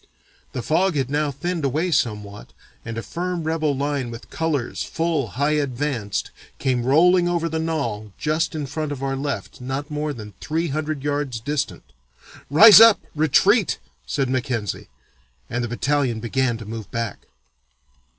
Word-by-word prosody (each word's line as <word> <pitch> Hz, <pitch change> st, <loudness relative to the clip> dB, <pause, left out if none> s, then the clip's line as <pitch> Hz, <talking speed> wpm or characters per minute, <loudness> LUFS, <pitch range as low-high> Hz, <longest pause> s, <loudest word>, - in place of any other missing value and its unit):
The 125 Hz, -, -4 dB
fog 180 Hz, +5 st, +2 dB
had 135 Hz, -2 st, -1 dB
now 150 Hz, 0 st, +1 dB
thinned 170 Hz, +4 st, -3 dB
away 155 Hz, +7 st, 0 dB
somewhat 105 Hz, -7 st, -2 dB, 0.3 s
and 115 Hz, -1 st, -6 dB
a 115 Hz, -, -3 dB
firm 180 Hz, 0 st, -3 dB
rebel 155 Hz, -3 st, 0 dB
line 140 Hz, -3 st, -1 dB
with 115 Hz, 0 st, -10 dB
colors 150 Hz, -7 st, -2 dB
full 160 Hz, -6 st, -1 dB
high 145 Hz, +2 st, +2 dB
advanced 135 Hz, -7 st, -1 dB, 0.3 s
came 125 Hz, -3 st, 0 dB
rolling 175 Hz, +6 st, +5 dB
over 170 Hz, -1 st, 0 dB
the 160 Hz, 0 st, -2 dB
knoll 120 Hz, -11 st, -2 dB
just 155 Hz, +2 st, 0 dB
in 150 Hz, -2 st, -2 dB
front 150 Hz, +2 st, -4 dB
of 135 Hz, -2 st, -5 dB
our 135 Hz, 0 st, -1 dB
left 135 Hz, -6 st, -4 dB
not 135 Hz, +4 st, -4 dB
more 150 Hz, 0 st, -2 dB
than 105 Hz, -6 st, -8 dB
three 165 Hz, +2 st, -1 dB
hundred 155 Hz, 0 st, -3 dB
yards 145 Hz, -4 st, -1 dB
distant. 145 Hz, +4 st, -3 dB, 0.7 s
'Rise 210 Hz, +9 st, +10 dB
up, 225 Hz, -2 st, +8 dB
Retreat,' 170 Hz, -, +3 dB, 0.3 s
said 135 Hz, -, 0 dB
Mackenzie, 125 Hz, -5 st, -2 dB, 0.6 s
and 120 Hz, +1 st, -1 dB
the -, -, -1 dB
battalion 130 Hz, -1 st, 0 dB
began 120 Hz, +1 st, 0 dB
to 115 Hz, -, -9 dB
move 110 Hz, -1 st, -7 dB
back. 115 Hz, -3 st, -4 dB
145 Hz, 155 wpm, -22 LUFS, 120-160 Hz, 0.7 s, Rise